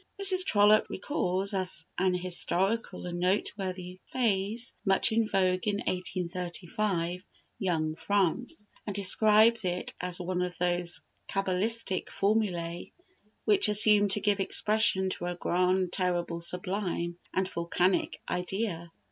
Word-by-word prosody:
Mrs. 380 Hz, -2 st, +5 dB
Trollope 210 Hz, -, +4 dB
records 190 Hz, -, -2 dB
as 185 Hz, -4 st, -2 dB
an 185 Hz, 0 st, +1 dB
historical 185 Hz, +5 st, -1 dB
and 175 Hz, 0 st, -4 dB
noteworthy 185 Hz, -1 st, -2 dB
phrase, 225 Hz, 0 st, -1 dB
much 195 Hz, +2 st, +2 dB
in 225 Hz, 0 st, +2 dB
vogue 185 Hz, -1 st, +1 dB
in 205 Hz, -, +1 dB
1835, 180 Hz, -1 st, -3 dB, 0.4 s
"Young 160 Hz, -5 st, 0 dB
France," 200 Hz, -, -1 dB, 0.2 s
and 205 Hz, -, -4 dB
describes 215 Hz, +3 st, +4 dB
it 180 Hz, -1 st, -2 dB
as 180 Hz, 0 st, -3 dB
one 180 Hz, 0 st, -2 dB
of 180 Hz, 0 st, -3 dB
those 175 Hz, 0 st, -1 dB, 0.3 s
cabalistic 195 Hz, +1 st, -1 dB
formulæ 185 Hz, -5 st, -1 dB, 0.5 s
which 405 Hz, -, +4 dB
assume 210 Hz, 0 st, +6 dB
to 200 Hz, -, +1 dB
give 205 Hz, -1 st, +1 dB
expression 195 Hz, -1 st, +3 dB
to 175 Hz, -, -5 dB
a 175 Hz, 0 st, -3 dB
grand, 180 Hz, +1 st, 0 dB
terrible, 175 Hz, -2 st, -1 dB
sublime, 180 Hz, -1 st, -3 dB
and 190 Hz, 0 st, 0 dB
volcanic 175 Hz, +1 st, 0 dB
idea. 180 Hz, -1 st, -3 dB
185 Hz, 120 wpm, -29 LUFS, 180-210 Hz, 0.5 s, assume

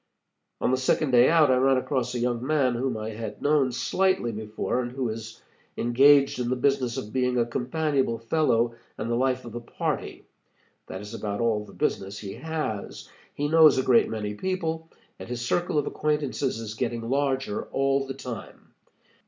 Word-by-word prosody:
On -, -, +1 dB
the 130 Hz, -, +2 dB
second 130 Hz, +2 st, +1 dB
day 120 Hz, 0 st, +6 dB
out, 160 Hz, -4 st, +5 dB
I 130 Hz, -, +4 dB
ran 135 Hz, +1 st, +4 dB
across 125 Hz, -2 st, -1 dB
a -, -, -1 dB
young 120 Hz, 0 st, -1 dB
man 135 Hz, -3 st, +2 dB
whom 120 Hz, -1 st, -1 dB
I 110 Hz, +1 st, -4 dB
had 110 Hz, -1 st, -6 dB
known 145 Hz, -3 st, +2 dB
slightly 185 Hz, -3 st, +1 dB
before, 110 Hz, +3 st, -2 dB
and 120 Hz, -1 st, -4 dB
who 130 Hz, -3 st, -2 dB
is 110 Hz, +1 st, -7 dB, 0.3 s
engaged 135 Hz, +3 st, +5 dB
in 120 Hz, -1 st, -1 dB
the 130 Hz, -, +1 dB
business 130 Hz, -2 st, +1 dB
of 105 Hz, -, -6 dB
being 125 Hz, -1 st, +1 dB
a 120 Hz, -, +3 dB
companionable 130 Hz, 0 st, -1 dB
fellow 115 Hz, -1 st, +1 dB, 0.2 s
and 115 Hz, +2 st, -3 dB
the -, -, +2 dB
life 130 Hz, +1 st, 0 dB
of 120 Hz, -, -8 dB
the 120 Hz, +2 st, -6 dB
party. 120 Hz, -, -4 dB, 0.6 s
That 95 Hz, -, -6 dB
is 105 Hz, +2 st, -9 dB
about 105 Hz, -2 st, -4 dB
all 115 Hz, -3 st, +1 dB
the -, -, -14 dB
business 100 Hz, +1 st, -2 dB
he 100 Hz, -2 st, -7 dB
has. 155 Hz, -11 st, -5 dB, 0.3 s
He 145 Hz, -, -1 dB
knows 155 Hz, -2 st, +6 dB
a 130 Hz, -, +2 dB
great 125 Hz, -2 st, +4 dB
many 105 Hz, -2 st, -3 dB
people, 165 Hz, -, -3 dB, 0.3 s
and -, -, -9 dB
his 120 Hz, -1 st, -3 dB
circle 175 Hz, +5 st, 0 dB
of 145 Hz, -, +2 dB
acquaintances 145 Hz, -4 st, -1 dB
is 110 Hz, -2 st, -6 dB
getting 115 Hz, +1 st, -3 dB
larger 135 Hz, -4 st, -1 dB
all 135 Hz, 0 st, 0 dB
the 135 Hz, -, -5 dB
time. 125 Hz, -4 st, -9 dB
125 Hz, 185 wpm, -26 LUFS, 115-140 Hz, 0.6 s, day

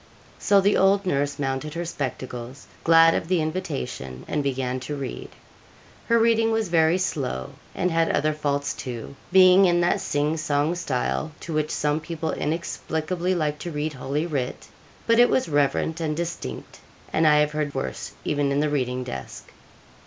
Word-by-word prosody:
So 200 Hz, -1 st, +4 dB
the 200 Hz, +2 st, +3 dB
old 195 Hz, +1 st, +3 dB
nurse 145 Hz, -5 st, 0 dB
mounted 140 Hz, +2 st, -3 dB
her 170 Hz, +1 st, -3 dB
spectacles, 130 Hz, -4 st, -5 dB, 0.2 s
glad 165 Hz, 0 st, +6 dB
of -, -, -2 dB
the 180 Hz, -1 st, +2 dB
invitation, 65 Hz, -, -4 dB
and 150 Hz, -, -1 dB
began 130 Hz, -2 st, -2 dB
to 140 Hz, +4 st, -5 dB
read. 135 Hz, -3 st, -6 dB, 0.8 s
Her 235 Hz, -, +4 dB
reading 225 Hz, 0 st, +3 dB
was 225 Hz, -4 st, 0 dB
very, 165 Hz, 0 st, +4 dB
slow, 130 Hz, -, -2 dB, 0.2 s
and 180 Hz, -, 0 dB
had 165 Hz, 0 st, +2 dB
other 155 Hz, +1 st, +1 dB
faults 145 Hz, -1 st, -1 dB
too, 125 Hz, +1 st, -7 dB, 0.2 s
being 185 Hz, +1 st, +7 dB
in 175 Hz, -1 st, +3 dB
that 175 Hz, -, +2 dB
sing 150 Hz, +2 st, 0 dB
song 150 Hz, 0 st, 0 dB
style 135 Hz, -, -2 dB
to 165 Hz, -, -6 dB
which 155 Hz, 0 st, 0 dB
some 150 Hz, +1 st, 0 dB
people 160 Hz, 0 st, -4 dB
inexplicably 170 Hz, +3 st, -2 dB
like 150 Hz, -3 st, -1 dB
to 175 Hz, -, -5 dB
read 150 Hz, -1 st, -3 dB
Holy 140 Hz, +4 st, -2 dB
Writ; 140 Hz, -7 st, -3 dB, 0.4 s
but 230 Hz, 0 st, +4 dB
it 245 Hz, -, +7 dB
was 255 Hz, -, +1 dB
reverent 145 Hz, +2 st, +1 dB
and 155 Hz, -1 st, -1 dB
distinct, 170 Hz, -, -5 dB, 0.3 s
and 160 Hz, 0 st, +3 dB
I 150 Hz, -, +6 dB
have 150 Hz, 0 st, +3 dB
heard 150 Hz, -2 st, -2 dB
worse 135 Hz, -, -4 dB
even 145 Hz, -1 st, 0 dB
in 140 Hz, -, +1 dB
the 150 Hz, 0 st, +1 dB
reading 125 Hz, -3 st, -1 dB
desk. 65 Hz, -, -8 dB
150 Hz, 170 wpm, -24 LUFS, 140-170 Hz, 0.8 s, being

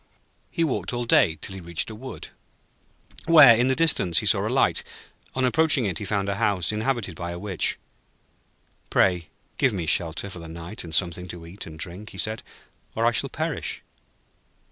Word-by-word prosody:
He 165 Hz, -, 0 dB
walked 140 Hz, -4 st, -1 dB
all 120 Hz, 0 st, -2 dB
day, 80 Hz, -8 st, +4 dB
till 95 Hz, -, -5 dB
he 95 Hz, -, -8 dB
reached 85 Hz, +5 st, -3 dB
a -, -, -7 dB
wood, 130 Hz, +5 st, -9 dB, 1.0 s
where, 150 Hz, -8 st, +9 dB
in 120 Hz, +3 st, +2 dB
the 130 Hz, -, +2 dB
distance, 140 Hz, -, +2 dB
he -, -, +2 dB
saw -, -, +3 dB
a -, -, -1 dB
light. -, -, +2 dB, 0.5 s
On 130 Hz, 0 st, +1 dB
approaching 150 Hz, -2 st, +3 dB
it, 90 Hz, -5 st, -2 dB
he 105 Hz, -, -5 dB
found 100 Hz, 0 st, -1 dB
a 100 Hz, 0 st, -1 dB
house 95 Hz, -3 st, +1 dB
inhabited 110 Hz, -4 st, -2 dB
by 85 Hz, +1 st, -5 dB
a 85 Hz, -, -5 dB
Witch. 95 Hz, -2 st, -1 dB, 1.1 s
'Pray 90 Hz, -4 st, +2 dB, 0.3 s
give 130 Hz, -, +3 dB
me 90 Hz, -4 st, -3 dB
shelter 85 Hz, +4 st, 0 dB
for 90 Hz, -, -7 dB
the 85 Hz, -, -9 dB
night, 85 Hz, +5 st, -6 dB
and 80 Hz, -2 st, -2 dB
something 90 Hz, +1 st, 0 dB
to 85 Hz, -1 st, -8 dB
eat 90 Hz, +4 st, -9 dB
and 80 Hz, -1 st, -10 dB
drink,' 90 Hz, +6 st, -5 dB
he -, -, -12 dB
said, 110 Hz, +1 st, -1 dB, 0.5 s
'or -, -, +1 dB
I -, -, +5 dB
shall -, -, 0 dB
perish.' -, -, -3 dB
95 Hz, 190 wpm, -25 LUFS, 85-120 Hz, 1.1 s, where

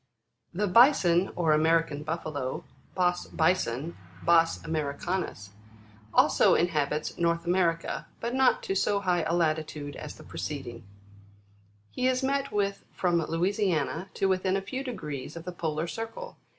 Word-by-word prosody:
16. -, -, -11 dB
The 180 Hz, -, -5 dB
Bison, 195 Hz, -, +5 dB
or 165 Hz, -3 st, +2 dB
American 160 Hz, -1 st, +2 dB
Buffalo, 150 Hz, -4 st, -4 dB, 0.3 s
Bos 180 Hz, -1 st, +1 dB
Rison; 160 Hz, -3 st, 0 dB, 0.3 s
Kos 165 Hz, -1 st, +4 dB
Ameri 155 Hz, -3 st, -2 dB
canus, 175 Hz, -, -3 dB, 0.6 s
also -, -, +5 dB
inhabits 150 Hz, -3 st, 0 dB
North 170 Hz, 0 st, +1 dB
America, 175 Hz, -2 st, 0 dB
but 235 Hz, +1 st, -3 dB
not 260 Hz, -1 st, +3 dB
to -, -, -1 dB
so 200 Hz, +1 st, +1 dB
high 180 Hz, -3 st, +1 dB
a 165 Hz, +1 st, 0 dB
latitude 155 Hz, -3 st, -1 dB
as 150 Hz, -, -8 dB
the -, -, -13 dB
preceding. 125 Hz, -6 st, -6 dB, 1.1 s
He 255 Hz, -, 0 dB
is 255 Hz, +1 st, +1 dB
met 275 Hz, +1 st, 0 dB
with 200 Hz, -1 st, -1 dB
from 175 Hz, -2 st, +1 dB
Louisiana 180 Hz, +1 st, 0 dB
to 195 Hz, -, +1 dB
within 190 Hz, 0 st, +1 dB
a -, -, -2 dB
few 260 Hz, +7 st, -4 dB
degrees 150 Hz, -, -6 dB
of 165 Hz, -, -7 dB
the 180 Hz, -, -4 dB
polar 160 Hz, -2 st, -2 dB
circle. 225 Hz, -, -6 dB
170 Hz, 145 wpm, -28 LUFS, 155-195 Hz, 1.1 s, Bison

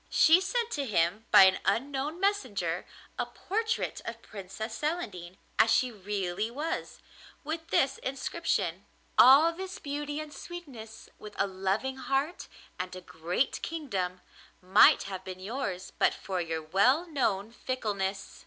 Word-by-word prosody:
She 325 Hz, +4 st, +6 dB
sent 465 Hz, +4 st, -1 dB
to 280 Hz, -, -2 dB
him 195 Hz, +2 st, +1 dB
by 205 Hz, -2 st, +9 dB
an 190 Hz, 0 st, +5 dB
unknown 275 Hz, -, -1 dB
messenger 210 Hz, -, -1 dB, 0.3 s
a -, -, 0 dB
portrait 445 Hz, +3 st, -2 dB
of 230 Hz, 0 st, -7 dB
Princess 205 Hz, +3 st, -7 dB
Celandine 205 Hz, -, -3 dB, 0.2 s
as 225 Hz, -, +6 dB
she 255 Hz, +2 st, +3 dB
really 200 Hz, -1 st, -3 dB
was, 295 Hz, +7 st, -4 dB, 0.4 s
with 320 Hz, +2 st, -4 dB
this 270 Hz, -4 st, +2 dB
inscription: 255 Hz, -, -2 dB, 0.3 s
'All 285 Hz, +6 st, +8 dB
this 375 Hz, +2 st, -6 dB
beauty 290 Hz, 0 st, -4 dB
and 305 Hz, -1 st, -7 dB
sweetness, 260 Hz, -11 st, -10 dB
with 210 Hz, -1 st, -10 dB
a 195 Hz, -, +2 dB
loving 195 Hz, +7 st, -2 dB
heart 275 Hz, +6 st, -1 dB, 0.3 s
and 185 Hz, 0 st, -4 dB
a 185 Hz, -, -8 dB
great 175 Hz, +8 st, -2 dB
kingdom, 195 Hz, -, -3 dB, 0.4 s
might 185 Hz, +1 st, +6 dB
have 190 Hz, -2 st, -6 dB
been 185 Hz, -1 st, -7 dB
yours 195 Hz, -3 st, -4 dB
but -, -, +3 dB
for 185 Hz, -2 st, -3 dB
your 160 Hz, -1 st, -3 dB
well 220 Hz, -, +3 dB
known 225 Hz, -, -1 dB
fickleness. 205 Hz, -6 st, -3 dB
225 Hz, 140 wpm, -29 LUFS, 190-295 Hz, 0.4 s, by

